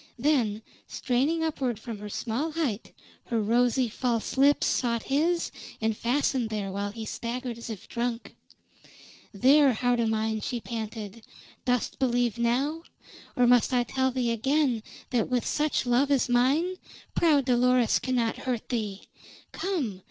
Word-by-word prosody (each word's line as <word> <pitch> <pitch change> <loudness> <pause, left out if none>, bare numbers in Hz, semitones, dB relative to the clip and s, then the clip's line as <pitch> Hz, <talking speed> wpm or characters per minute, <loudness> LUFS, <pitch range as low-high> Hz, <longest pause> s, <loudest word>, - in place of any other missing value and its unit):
Then, 235 -6 +1 0.2
straining 280 +7 0
upward 265 -7 -1
from 230 -3 -7
her 210 0 -7
small 250 +10 -2
height, 270 -10 -2 0.3
her 230 - -1
rosy, 240 +3 +2
false 230 0 -2
lips 280 +2 +4
sought 235 -2 0
his 330 +5 +1 0.3
and 220 -1 0
fastened 245 0 0
there 205 -3 -3
while 200 +1 -2
he 220 +1 -7
staggered 240 +2 -4
as 235 - -8
if 215 -5 -7
drunk. 235 0 -3 1.0
"There, 270 +6 +5
heart 245 +1 +1
o' 230 - +2
mine!" 220 0 -1
she 240 +3 -3
panted. 220 -2 -6 0.4
"Dost 250 0 0
believe 245 -3 +1
now? 270 +7 0 0.5
Or 250 - +4
must 245 +1 +4
I 245 -1 +3
tell 260 +2 0
thee 250 -2 0
again 260 +1 +1 0.3
that 240 -4 +1
with 250 -2 0
such 300 -2 0
love 250 +3 +2
as 275 -3 +2
mine 275 +10 +2 0.4
proud 295 -5 +3
Dolores 250 -1 +3
cannot 245 -3 0
hurt 250 -4 -3
thee. 210 -5 -3 0.5
Come! 285 - -2
245 Hz, 145 wpm, -27 LUFS, 225-270 Hz, 1.0 s, There